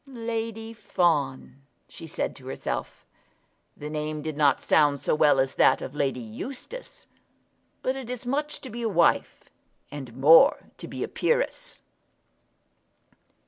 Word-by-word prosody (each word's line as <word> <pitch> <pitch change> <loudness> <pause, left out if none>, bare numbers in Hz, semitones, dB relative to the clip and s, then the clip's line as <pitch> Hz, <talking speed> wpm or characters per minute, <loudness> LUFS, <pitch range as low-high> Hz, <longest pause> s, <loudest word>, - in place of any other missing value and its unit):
"Lady 225 -2 -4
Fawn!" 140 - -1 0.3
she 165 - -11
said - - -3
to 130 -2 -13
herself. - - -5 0.7
The 150 - -7
name 150 0 -4
did 155 -2 -4
not 145 -3 +3
sound 145 -2 +3
so - - 0
well 150 -2 +4
as 135 0 +1
that - - +4
of 130 - -7
Lady 140 -3 -1
Eustace. 255 - -8 0.8
But 260 - 0
it 265 -3 -7
is 250 0 -5
much 295 +4 -2
to 260 - -9
be 240 +2 -6
a 230 - 0
wife; 170 -4 +1 0.4
and 130 -5 -8
more 165 - +6
to - - -7
be - - -5
a - - -2
peeress. 485 +1 -1
160 Hz, 140 wpm, -26 LUFS, 140-235 Hz, 0.8 s, more